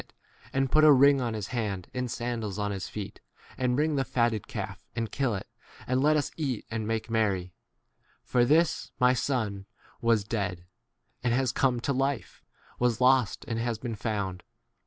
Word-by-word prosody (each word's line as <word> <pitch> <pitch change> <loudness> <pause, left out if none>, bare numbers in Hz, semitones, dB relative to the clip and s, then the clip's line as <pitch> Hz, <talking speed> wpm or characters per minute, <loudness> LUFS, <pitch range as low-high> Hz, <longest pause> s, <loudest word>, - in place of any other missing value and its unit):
[it], - - -25 0.4
and 135 -1 0
put 155 - +5
a 155 - +9
ring 140 0 +6
on 115 -3 -1
his 105 -1 -4
hand 105 -7 -2
23 125 - -4
and 125 -1 -2
sandals 115 -3 -3
on 105 -1 -1
his 95 -2 -4
feet; 105 -2 -7 0.3
and 125 -1 +1
bring 150 +1 +1
the 135 - +2
fatted 115 -5 0
calf - - -5
and 115 -2 -2
kill 130 -5 0
it, 95 - -5 0.4
and 130 +1 +1
let 150 +2 +5
24 - - +3
us 145 - -1
eat 135 -8 -2
and 110 -1 -2
make 115 +1 -2
merry: 95 -6 0 0.7
for 125 -1 +2
this 155 +6 +2
my 125 0 +5
son 110 -7 -1 0.3
was 115 -3 +3
dead 95 -5 -3 0.6
and 120 -1 +2
has 130 -1 +1
come 130 -3 +1
to 140 +4 -1
lif 135 -4 -2
e,P - - -39 0.2
was 120 -2 +2
lost 125 -3 +3
and 115 0 -2
has 115 -1 -1
been 120 +1 -4
found. 100 -4 -3
120 Hz, 195 wpm, -28 LUFS, 105-130 Hz, 0.7 s, a